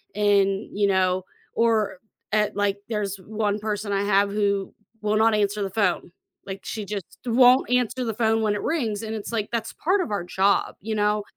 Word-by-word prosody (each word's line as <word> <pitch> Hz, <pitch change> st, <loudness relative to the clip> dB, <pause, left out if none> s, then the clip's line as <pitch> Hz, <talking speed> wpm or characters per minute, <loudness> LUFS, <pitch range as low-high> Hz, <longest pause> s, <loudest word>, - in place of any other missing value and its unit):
and, 200 Hz, -1 st, +1 dB
you 205 Hz, -1 st, +3 dB
know 185 Hz, -1 st, +2 dB, 0.3 s
or 215 Hz, -5 st, +1 dB, 0.3 s
at 210 Hz, 0 st, +1 dB
like, 205 Hz, -1 st, 0 dB
there's 205 Hz, -3 st, -2 dB
one 210 Hz, +1 st, -2 dB
person 210 Hz, -1 st, -3 dB
I 200 Hz, 0 st, +1 dB
have 200 Hz, 0 st, +2 dB
who 200 Hz, -1 st, 0 dB, 0.3 s
will 210 Hz, 0 st, +1 dB
not 225 Hz, +1 st, +4 dB
answer 205 Hz, 0 st, 0 dB
the 195 Hz, -, -2 dB
phone, 185 Hz, -4 st, 0 dB, 0.3 s
like, 195 Hz, 0 st, -6 dB
she 215 Hz, -2 st, -4 dB
just 200 Hz, -2 st, -4 dB, 0.2 s
won't 250 Hz, +2 st, +5 dB
answer 250 Hz, 0 st, +1 dB
the 225 Hz, -, -2 dB
phone 225 Hz, 0 st, +1 dB
when 210 Hz, -1 st, +2 dB
it 205 Hz, -, -3 dB
rings, 230 Hz, -11 st, -1 dB
and 220 Hz, 0 st, -4 dB
it's 215 Hz, 0 st, -6 dB
like, 215 Hz, -2 st, -1 dB
"That's 230 Hz, -2 st, -3 dB
part 375 Hz, +4 st, +1 dB
of 240 Hz, -, -4 dB
our 200 Hz, -4 st, -1 dB
job, 190 Hz, +3 st, +1 dB
you 220 Hz, +2 st, -3 dB
know?" 210 Hz, 0 st, +1 dB
210 Hz, 195 wpm, -24 LUFS, 200-220 Hz, 0.3 s, won't